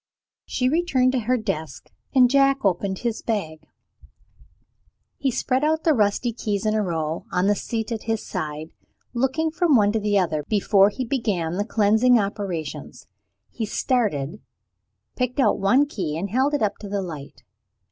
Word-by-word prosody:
She 255 - 0
returned 270 -4 +2
to 260 - 0
her 255 - +4
desk; 160 - -5 0.2
and 255 -1 +7
Jack 275 -1 +3
opened 190 +1 0
his 235 0 -3
bag. 165 -9 -3 1.6
He 275 - +1
spread 255 +2 0
out 315 +1 +1
the 320 - +4
rusty 225 +1 +1
keys 210 -3 -3
in 215 - +2
a 215 - +1
row, 165 -4 -3
on 180 +1 +1
the 205 - +4
seat 225 +2 -4
at 225 -2 -4
his 225 -1 -2
side. 155 +1 -5 0.4
Looking 270 +6 0
from 330 -2 +2
one 205 -3 +4
to 220 - 0
the 205 -1 +1
other 160 -5 0
before 200 -1 +4
he 255 +5 -4
began 195 -10 -1
the 205 - 0
cleansing 220 +3 +4
operations, 195 -7 -4 0.5
he 225 -3 -4
started, 205 - -1 0.7
picked 250 +2 -2
out 265 - +3
one 250 +9 +4
key, 175 - -4
and 190 +3 -4
held 265 +5 +2
it 285 - 0
up 205 - -1
to 205 - -8
the 200 -1 -2
light. 150 -8 -9
215 Hz, 165 wpm, -23 LUFS, 190-255 Hz, 1.6 s, and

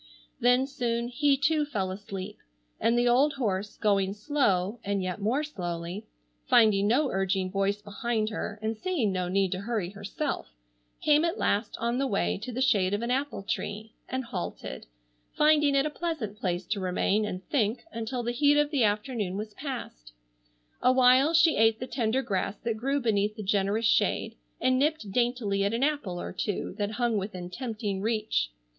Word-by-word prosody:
Then 245 +2 +4
soon 240 -3 -2
he 275 +2 +2
too 300 +2 +2
fell 205 -11 -2
asleep, 195 0 -7 0.4
and 230 +1 +2
the 240 0 +3
old 270 +5 +4
horse, 210 -6 -2
going 200 -2 +1
slow, 210 -5 0
and 200 -1 -1
yet 185 +2 -4
more 245 +9 +1
slowly, 175 - -5 0.4
finding 205 -3 +5
no 265 +5 +2
urging 190 -1 0
voice 200 +1 0
behind 215 +1 -1
her 215 0 -4
and 220 +1 -1
seeing 260 - 0
no 180 -1 -1
need 190 0 +1
to 185 - -2
hurry 200 -4 -2
herself, 205 +9 -4 0.6
came 300 +1 +5
at 340 +4 0
last 205 +2 0
on 235 +2 -1
the 275 - +1
way 200 -3 0
to 245 +5 -6
the 255 +2 0
shade 200 -6 +3
of 210 - -3
an 240 - -1
apple 270 -5 -1
tree, 215 +1 -4 0.2
and 260 0 -2
halted, 185 -6 -6 0.5
finding 300 -2 +4
it 275 +1 +3
a 305 - -1
pleasant 300 -11 -3
place 180 -3 -2
to 205 +3 -2
remain 190 +3 +1
and 185 -3 -5
think 225 -4 +1
until 235 +1 -3
the 240 - -1
heat 290 +4 +4
of 295 0 +2
the 275 -6 +2
afternoon 210 -2 0
was 210 0 -5
passed. 230 - -7 0.7
Awhile 255 +4 +5
she 325 0 +5
ate 225 0 +4
the 255 - -3
tender 250 0 0
grass 195 -1 -1
that 230 -1 -1
grew 275 +6 0
beneath 215 -4 +1
the 215 - -6
generous 200 +3 +1
shade, 220 +1 +2 0.2
and 255 +1 +2
nipped 295 -8 0
daintily 235 -4 +1
at 200 +3 +1
an 240 - 0
apple 280 -12 -1
or - - -5
two 205 - -3
that 205 +1 -1
hung 235 -2 +1
within 185 -3 -6
tempting 210 -3 -3
reach. 215 - 0
220 Hz, 180 wpm, -28 LUFS, 200-260 Hz, 0.7 s, finding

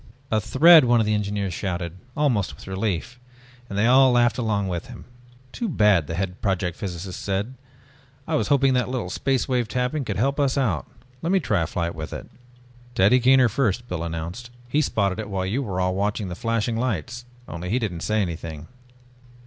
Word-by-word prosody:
"A 110 -1 +2
thread!" 155 - +7
one 120 -1 +4
of 110 - +2
the 105 - +1
engineers 100 -2 -1
shouted, 90 -1 -4 0.2
almost 125 -10 +1
with - - -14
relief, 95 +4 -3 0.5
and 100 - -4
they 105 - +3
all 130 +2 +6
laughed 120 0 +3
along 105 -4 0
with 85 -2 -4
him. 120 - -11 0.5
"Too 235 - -3
bad," 105 - +3
the 80 - -4
head 95 0 -3
project 95 -4 -1
physicist 90 -1 -6
said, 100 +5 -2 0.7
"I 160 - -2
was 155 - +1
hoping 135 -2 +3
that 125 -1 +1
a - - -7
little 120 -9 -3
Space 135 +3 0
Wave 125 -4 0
Tapping 125 +5 -1
could 105 -6 -3
help 135 +6 0
us 140 -1 +1
out. 110 - 0 0.3
Let 170 - -1
me 195 - +4
try 105 - 0
a 80 - -1
flight 85 -1 -2
with 80 -1 -7
it." - - -7 0.7
"Teddy 105 +7 +5
Kaner 130 0 +5
first," 120 0 0
Biff 90 - -3
announced. 85 +8 -5 0.2
"He 145 +5 +1
spotted 100 -7 0
it 105 -1 -5
while 95 -2 -2
you 110 +9 -1
were 95 -8 -3
all 90 0 +1
watching 100 +1 -1
the 90 - -5
flashing 115 +2 -1
lights, 120 +1 -3 0.2
only 85 +3 -6
he 115 - +1
didn't 100 -9 -3
say 105 +4 0
anything." 80 -3 -6
105 Hz, 200 wpm, -24 LUFS, 90-125 Hz, 0.7 s, thread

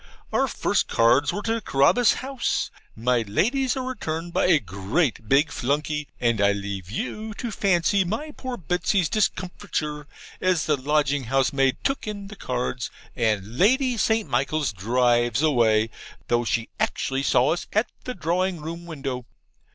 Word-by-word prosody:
Our - - +3
first - - 0
cards 120 +5 +3
were 205 - -4
to 230 0 -1
Carabas 195 - +4
House; 270 -2 -1 0.2
my 120 +1 +1
Lady's 255 - +1
are 260 - -2
returned 170 -9 -4
by - - +2
a 175 -3 +6
great 105 - -1
big 145 +4 +4
flunkey; 150 +3 -1
and 115 -3 +1
I 100 0 +4
leave 100 -2 -5
you 210 - -4
to 240 0 -4
fancy 195 0 +2
my 220 - -3
poor 260 -3 -6
Betsy's 180 +1 +1
discomfiture 180 -7 -2 0.3
as 185 -4 +2
the 150 - +2
lodging 145 0 +1
house 135 +4 +1
maid 135 -1 +2
took 275 -4 -1
in 200 -2 -5
the 215 - -9
cards, 125 -5 -3 0.3
and 110 0 -1
Lady 255 +5 +4
St. 220 -1 +1
Michaels 140 -3 0
drives 120 - +2
away, 115 -7 +3 0.4
though 120 0 +2
she 115 0 -1
actually 135 0 0
saw 130 -1 +3
us 175 - -5
at 215 +3 +2 0.2
the 250 - -4
drawing 180 +1 0
room 170 +3 -7
window. 135 -6 -5
150 Hz, 155 wpm, -24 LUFS, 120-200 Hz, 0.4 s, a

